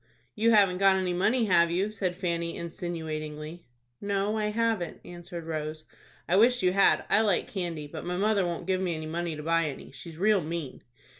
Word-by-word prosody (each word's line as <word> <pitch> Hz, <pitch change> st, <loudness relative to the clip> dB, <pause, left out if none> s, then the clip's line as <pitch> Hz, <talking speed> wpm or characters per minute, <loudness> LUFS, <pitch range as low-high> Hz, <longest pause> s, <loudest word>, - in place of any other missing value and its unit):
"You 225 Hz, +2 st, +2 dB
haven't 200 Hz, -5 st, +4 dB
got 195 Hz, -1 st, +5 dB
any 185 Hz, -1 st, 0 dB
money, 225 Hz, +7 st, +2 dB
have 170 Hz, -4 st, +4 dB
you?" 190 Hz, +5 st, 0 dB
said 190 Hz, -4 st, -2 dB
Fanny, 170 Hz, -2 st, -2 dB
insinuatingly. 160 Hz, -2 st, -6 dB, 0.3 s
"No, 200 Hz, +1 st, 0 dB
I 215 Hz, -1 st, 0 dB
haven't," 215 Hz, -4 st, -1 dB
answered 175 Hz, 0 st, -8 dB
Rose. 155 Hz, -1 st, -4 dB, 0.4 s
"I 180 Hz, -, +3 dB
wish 240 Hz, +1 st, +4 dB
you 180 Hz, 0 st, +3 dB
had. 195 Hz, 0 st, +4 dB
I 215 Hz, -, +4 dB
like 205 Hz, -5 st, +2 dB
candy, 170 Hz, -6 st, -4 dB
but 145 Hz, -, -8 dB
mother 195 Hz, +3 st, +1 dB
won't 175 Hz, -1 st, -3 dB
give 190 Hz, -1 st, 0 dB
me 175 Hz, -3 st, -1 dB
any 155 Hz, 0 st, -5 dB
money 165 Hz, +1 st, -3 dB
to 150 Hz, -, -7 dB
buy 165 Hz, +1 st, +2 dB
any. 145 Hz, -3 st, -6 dB
She's 160 Hz, +4 st, -10 dB
real 205 Hz, +1 st, +3 dB
mean." 155 Hz, -4 st, -5 dB
175 Hz, 190 wpm, -28 LUFS, 165-200 Hz, 0.4 s, got